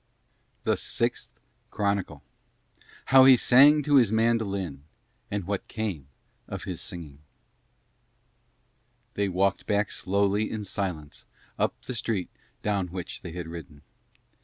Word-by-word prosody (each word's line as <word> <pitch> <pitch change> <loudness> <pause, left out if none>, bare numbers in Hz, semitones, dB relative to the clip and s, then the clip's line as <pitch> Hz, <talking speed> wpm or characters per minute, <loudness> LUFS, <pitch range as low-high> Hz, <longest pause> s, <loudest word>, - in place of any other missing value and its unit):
THE - - +1
SIXTH - - -2 0.4
CHRONICLE 100 -8 -2 0.8
HOW 135 -1 +7
HE 130 -1 +8
SANG 145 +5 +6
TO 145 -1 +4
HIS 120 -6 +4
MANDOLIN 100 -9 0 0.5
AND 100 -1 -2
WHAT 100 0 -3
CAME 100 -11 -4 0.4
OF - - -6
HIS - - -5
SINGING 75 -5 -8 1.9
They 100 -1 0
walked 95 +2 0
back 105 -1 +1
slowly 100 +2 0
in 110 -1 -4
silence 90 -7 -5 0.3
up - - 0
the - - -5
street 115 -5 -2 0.3
down 100 -3 0
which 90 0 -7
they 85 - -8
had 85 -1 -5
ridden. 80 -3 -10
100 Hz, 120 wpm, -27 LUFS, 90-110 Hz, 1.9 s, HE